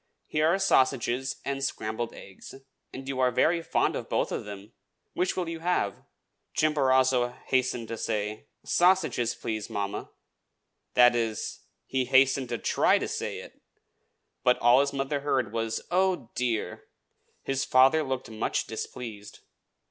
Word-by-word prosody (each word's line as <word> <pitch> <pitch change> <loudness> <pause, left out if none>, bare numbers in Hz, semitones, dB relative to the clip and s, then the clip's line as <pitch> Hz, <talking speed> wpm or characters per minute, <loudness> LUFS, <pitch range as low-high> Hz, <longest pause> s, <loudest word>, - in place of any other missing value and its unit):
"Here 155 +1 +1
are 170 +4 +3
sausages 130 -6 +1
and 135 0 -2
scrambled 115 -3 -3
eggs: 95 +5 -12 0.4
and 135 +1 -8
you 135 -1 -3
are 130 -1 +4
very 165 +7 +2
fond - - 0
of - - -5
both - - 0
of - - -3
them. 100 +2 -9 0.4
Which 180 +1 -1
will 180 -2 -1
you 165 0 -5
have?" 165 - -1 0.6
Chimborazo 130 -4 +3
hastened 125 -3 0
to 115 - -5
say, 105 0 -3 0.2
"Sausages, 175 -10 +2
please, 110 -2 -4
mamma," 100 -1 -4 0.9
that 125 -1 +6
is, 115 -2 -2 0.3
he 130 -1 -1
hastened 130 0 +3
to 120 - -2
try - - +3
to - - -3
say - - -4
it; - - -15 0.8
but 125 -1 +4
all 120 +2 +5
his 140 0 +2
mother 135 +1 -2
heard 130 -6 -1
was, 115 -1 -2
"Oh, 180 -9 +1
dear!" 120 -3 -2 0.6
His 135 0 -1
father 135 +4 +5
looked 130 -4 -4
much 110 0 -1
displeased. 110 -2 -7
130 Hz, 145 wpm, -27 LUFS, 115-140 Hz, 0.9 s, that